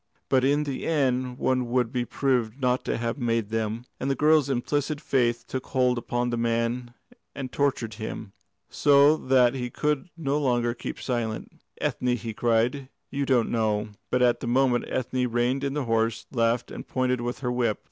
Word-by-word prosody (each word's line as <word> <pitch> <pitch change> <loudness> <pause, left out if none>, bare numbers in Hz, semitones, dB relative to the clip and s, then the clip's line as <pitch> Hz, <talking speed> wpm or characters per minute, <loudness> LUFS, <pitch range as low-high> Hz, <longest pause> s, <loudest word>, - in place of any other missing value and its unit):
But 130 -1 +3
in 145 +3 +3
the 140 -3 -4
end 130 -5 +1
one 130 -2 0
would 120 -1 +1
be 125 -1 0
proved 125 -2 0
not 125 -1 +1
to - - -1
have 115 +3 -2
made 115 -3 0
them." 110 +1 -2
And 135 - -2
the 135 - +1
girl's 150 -1 +4
implicit 145 +3 -1
faith 120 -5 +1
took 130 - -4
hold 125 -2 +2
upon 120 +1 -1
the 120 - -1
man 115 +1 -1 0.4
and 130 -2 -5
tortured 135 -6 0
him, 110 -1 -6 0.3
so 145 +1 +5
that 130 -4 +3
he 125 -2 -3
could 150 +6 -1
no 145 -2 0
longer 120 -4 +1
keep 120 - -6
silence. 115 -4 -3 0.3
"Ethne," 125 -1 0
he 115 -2 -5
cried, 120 +4 +1 0.2
"you 140 0 -2
don't 125 -4 +2
know 110 -2 0
" - - -49
But 125 0 +2
at 120 -1 +3
that 120 - -5
moment 125 0 +2
Ethne 125 0 -1
reined 120 +3 0
in 140 0 -1
her 145 - 0
horse, 115 -1 0
laughed, 115 -1 +1
and - - -8
pointed 125 -1 0
with 120 +2 -4
her 125 -2 -1
whip. 120 -3 +1
125 Hz, 190 wpm, -26 LUFS, 115-135 Hz, 0.4 s, so